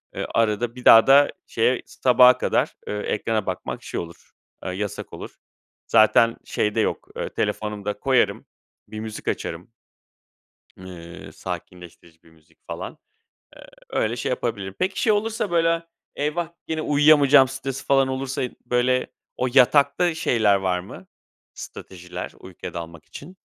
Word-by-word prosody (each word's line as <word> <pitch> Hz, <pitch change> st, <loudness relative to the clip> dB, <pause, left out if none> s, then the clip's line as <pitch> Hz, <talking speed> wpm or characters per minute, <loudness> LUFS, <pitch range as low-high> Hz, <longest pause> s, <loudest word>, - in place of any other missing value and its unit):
Iıı, -, -, -3 dB
arada 115 Hz, +1 st, 0 dB
bir 125 Hz, -, -11 dB
daha 115 Hz, -, +8 dB
da 140 Hz, +1 st, +6 dB, 0.2 s
şeye 120 Hz, +2 st, +1 dB
s -, -, -19 dB
sabaha 125 Hz, 0 st, +6 dB
kadar, -, -, 0 dB
ııı, 105 Hz, 0 st, -3 dB
ekrana 110 Hz, -1 st, -1 dB
bakmak, 95 Hz, -1 st, -5 dB
şey, -, -, -4 dB
olur, 85 Hz, 0 st, -10 dB, 0.3 s
aaa, 90 Hz, -, -4 dB
yasak 100 Hz, +1 st, -5 dB
olur. -, -, -9 dB, 0.5 s
Zaten 115 Hz, +1 st, +4 dB
şey 105 Hz, 0 st, -1 dB
de -, -, +1 dB
yok, -, -, -2 dB
ııı, -, -, -3 dB
telefonum 105 Hz, -2 st, -3 dB
da 105 Hz, 0 st, -3 dB
koyarım, 125 Hz, -7 st, +1 dB, 0.4 s
bir 110 Hz, -, -8 dB
müzik 110 Hz, -1 st, -7 dB
açarım. 85 Hz, +6 st, -4 dB, 1.1 s
Iıı, 90 Hz, -2 st, -11 dB
sakinleştirici 85 Hz, -2 st, -9 dB
bir 80 Hz, -, -21 dB
müzik 80 Hz, 0 st, -26 dB
falan. -, -, -7 dB, 0.6 s
Eee, -, -, -13 dB, 0.3 s
öyle 110 Hz, +2 st, -1 dB
şey 125 Hz, -, -3 dB
yapabilirim. 105 Hz, -6 st, -3 dB
Peki, 190 Hz, +1 st, -1 dB
şey 220 Hz, -, +4 dB
olursa, 215 Hz, -1 st, -1 dB
böyle, 165 Hz, -1 st, +2 dB, 0.3 s
"Eyvah, 155 Hz, +4 st, -2 dB, 0.2 s
gene 160 Hz, -1 st, -2 dB
uyuyamayacağım." 145 Hz, -2 st, +5 dB
stresi 135 Hz, +1 st, -5 dB
falan 135 Hz, -1 st, +3 dB
olursa 130 Hz, 0 st, -3 dB
i 125 Hz, -, -5 dB
böyle 125 Hz, +1 st, +1 dB, 0.3 s
o 130 Hz, -, 0 dB
yatakta 140 Hz, +5 st, +4 dB
şeyler 110 Hz, -9 st, +2 dB
var 95 Hz, -2 st, -1 dB
mı, 90 Hz, -, -12 dB, 0.5 s
stratejiler, 90 Hz, 0 st, -8 dB
uykuya 95 Hz, -1 st, -9 dB
dalmak 85 Hz, -1 st, -8 dB
için? 175 Hz, +6 st, -11 dB
115 Hz, 150 wpm, -23 LUFS, 95-140 Hz, 1.1 s, daha